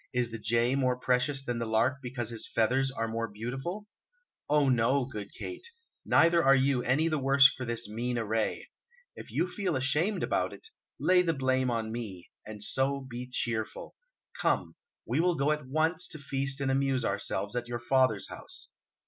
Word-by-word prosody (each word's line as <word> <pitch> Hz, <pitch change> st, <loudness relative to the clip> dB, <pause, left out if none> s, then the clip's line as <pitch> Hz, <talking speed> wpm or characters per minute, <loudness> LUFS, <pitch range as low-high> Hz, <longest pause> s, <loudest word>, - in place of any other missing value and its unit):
Is 125 Hz, -2 st, 0 dB
the 115 Hz, -, -6 dB
jay 115 Hz, +3 st, +2 dB
more 130 Hz, -2 st, +1 dB
precious 130 Hz, +2 st, +1 dB
than 120 Hz, -2 st, -2 dB
the 115 Hz, -, -2 dB
lark 115 Hz, +5 st, +2 dB
because 120 Hz, -3 st, -4 dB
his 115 Hz, -, -4 dB
feathers 130 Hz, +4 st, +1 dB
are 115 Hz, -4 st, -2 dB
more 115 Hz, 0 st, -2 dB
beautiful? 135 Hz, -, -5 dB, 0.6 s
Oh 150 Hz, -1 st, +4 dB
no, 130 Hz, +2 st, +2 dB
good 105 Hz, -6 st, -7 dB
Kate; 360 Hz, +5 st, -7 dB, 0.4 s
neither 170 Hz, 0 st, +4 dB
are 135 Hz, 0 st, +6 dB
you 135 Hz, -1 st, +2 dB
any 135 Hz, +6 st, +2 dB
the 155 Hz, -2 st, 0 dB
worse 135 Hz, +1 st, +7 dB
for 130 Hz, -2 st, -5 dB
this 115 Hz, -1 st, -1 dB
mean 120 Hz, +3 st, -3 dB
array. 110 Hz, -1 st, -2 dB, 0.4 s
If -, -, -10 dB
you 175 Hz, -, 0 dB
feel 195 Hz, +1 st, -2 dB
ashamed 150 Hz, +10 st, 0 dB
about -, -, 0 dB
it, 445 Hz, -, -8 dB, 0.3 s
lay 180 Hz, 0 st, +4 dB
the 165 Hz, -2 st, 0 dB
blame 130 Hz, -1 st, +1 dB
on 115 Hz, -2 st, -2 dB
me; 105 Hz, -7 st, -7 dB, 0.2 s
and 105 Hz, -1 st, -6 dB
so, 135 Hz, +5 st, +1 dB
be 125 Hz, 0 st, -7 dB
cheerful. 115 Hz, -3 st, -3 dB, 0.5 s
Come, -, -, +1 dB, 0.3 s
we -, -, 0 dB
will 175 Hz, +1 st, +3 dB
go 140 Hz, +1 st, +1 dB
at 150 Hz, -3 st, -2 dB
once 160 Hz, +5 st, +1 dB
to -, -, -3 dB
feast 140 Hz, -1 st, -2 dB
and 135 Hz, -1 st, +1 dB
amuse 135 Hz, -2 st, +1 dB
ourselves 100 Hz, +2 st, -1 dB
at 120 Hz, 0 st, -2 dB
your 120 Hz, 0 st, -3 dB
father's 130 Hz, -4 st, +2 dB
house. -, -, -6 dB
130 Hz, 180 wpm, -29 LUFS, 115-140 Hz, 0.6 s, worse